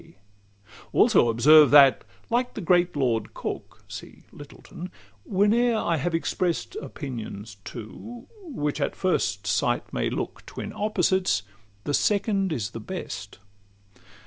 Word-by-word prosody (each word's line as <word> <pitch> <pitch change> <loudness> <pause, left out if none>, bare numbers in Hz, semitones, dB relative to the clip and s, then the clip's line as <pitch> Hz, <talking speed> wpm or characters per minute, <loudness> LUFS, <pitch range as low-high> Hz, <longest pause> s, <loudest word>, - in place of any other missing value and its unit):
Also 120 - +5
observe, 145 +6 +7
that, 140 -2 +7 0.3
like 245 +1 0
the - - -4
great 175 -1 +2
Lord 120 -6 -1
Coke - - -6
(See - - -10
Littleton), 150 +4 -10 0.4
whene'er 225 +5 +2
I 170 -6 0
have 165 +4 -1
express'd 175 - -1
Opinions 110 - -7
two, 230 - -9 0.2
which 155 - -3
at - - -1
first 110 - 0
sight 95 -2 0
may - - 0
look - - -5
Twin - - -7
opposites, 190 - +1 0.4
the 145 - -2
second 200 +1 +1
is 115 -8 -2
the 115 - -7
best. 105 - -7
160 Hz, 120 wpm, -25 LUFS, 120-195 Hz, 0.4 s, observe